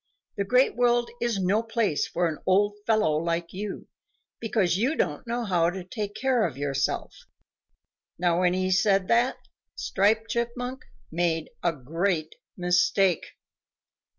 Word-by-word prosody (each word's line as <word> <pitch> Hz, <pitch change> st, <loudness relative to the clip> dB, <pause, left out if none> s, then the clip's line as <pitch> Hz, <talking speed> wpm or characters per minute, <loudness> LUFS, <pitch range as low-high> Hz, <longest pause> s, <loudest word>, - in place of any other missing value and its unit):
The 200 Hz, -, -1 dB
Great 250 Hz, +5 st, +3 dB
World 240 Hz, 0 st, +2 dB
is 235 Hz, -3 st, 0 dB
no 195 Hz, +3 st, +2 dB
place 225 Hz, -8 st, 0 dB
for 175 Hz, 0 st, 0 dB
an 155 Hz, -2 st, -4 dB
old 205 Hz, +2 st, +3 dB
fellow 215 Hz, -9 st, +3 dB
like 170 Hz, +1 st, -2 dB
you, 200 Hz, +1 st, -6 dB, 0.5 s
because 210 Hz, -6 st, +1 dB
you 250 Hz, +11 st, +1 dB
don't 150 Hz, -, -2 dB
know 235 Hz, 0 st, -2 dB
how 175 Hz, -4 st, +2 dB
to 185 Hz, +1 st, -6 dB
take 205 Hz, +2 st, -5 dB
care 255 Hz, -3 st, +1 dB
of 155 Hz, -9 st, -2 dB
yourself." 140 Hz, -1 st, -1 dB, 1.0 s
Now 175 Hz, 0 st, +2 dB
when 180 Hz, -1 st, +3 dB
he 185 Hz, 0 st, 0 dB
said 195 Hz, 0 st, +3 dB
that, 240 Hz, +3 st, +3 dB, 0.4 s
Striped 220 Hz, +3 st, +1 dB
Chipmunk 245 Hz, +2 st, -3 dB, 0.3 s
made 165 Hz, -1 st, -1 dB
a 170 Hz, -, +2 dB
great 160 Hz, +3 st, -2 dB, 0.2 s
mistake. 180 Hz, 0 st, +2 dB
195 Hz, 140 wpm, -26 LUFS, 170-230 Hz, 1.0 s, Great